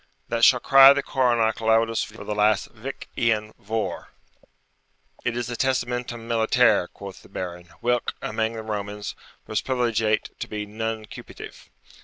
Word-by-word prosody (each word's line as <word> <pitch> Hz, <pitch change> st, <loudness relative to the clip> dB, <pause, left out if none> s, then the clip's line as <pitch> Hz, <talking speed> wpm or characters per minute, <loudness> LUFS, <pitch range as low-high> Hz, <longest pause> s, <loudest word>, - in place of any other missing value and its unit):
] -, -, -43 dB
that 115 Hz, 0 st, -1 dB
shall 125 Hz, -, +7 dB
cry 135 Hz, +1 st, +8 dB
the 140 Hz, 0 st, -1 dB
coronach 120 Hz, -4 st, +1 dB
loudest 115 Hz, 0 st, +2 dB
for 110 Hz, +1 st, -11 dB
the 105 Hz, -, -3 dB
last 105 Hz, 0 st, +2 dB
Vich 120 Hz, +4 st, -8 dB
lan 110 Hz, -2 st, 0 dB
Vohr.' 105 Hz, -4 st, -3 dB, 1.1 s
'It 120 Hz, 0 st, -1 dB
is 120 Hz, -, -2 dB
the 120 Hz, -, -5 dB
testamentum 125 Hz, -2 st, -2 dB
militare,' 115 Hz, -3 st, +3 dB
quoth 100 Hz, -1 st, -10 dB
the -, -, -18 dB
Baron, 90 Hz, -1 st, -6 dB
'whilk, 120 Hz, 0 st, 0 dB
amang 110 Hz, +1 st, -2 dB
the 110 Hz, -1 st, -6 dB
Romans, 105 Hz, -1 st, -4 dB, 0.3 s
was 110 Hz, -, -1 dB
privilegiate 115 Hz, -4 st, 0 dB
to -, -, -4 dB
be 105 Hz, -1 st, -4 dB
nuncupative.' 110 Hz, +1 st, -7 dB
115 Hz, 150 wpm, -24 LUFS, 105-120 Hz, 1.1 s, cry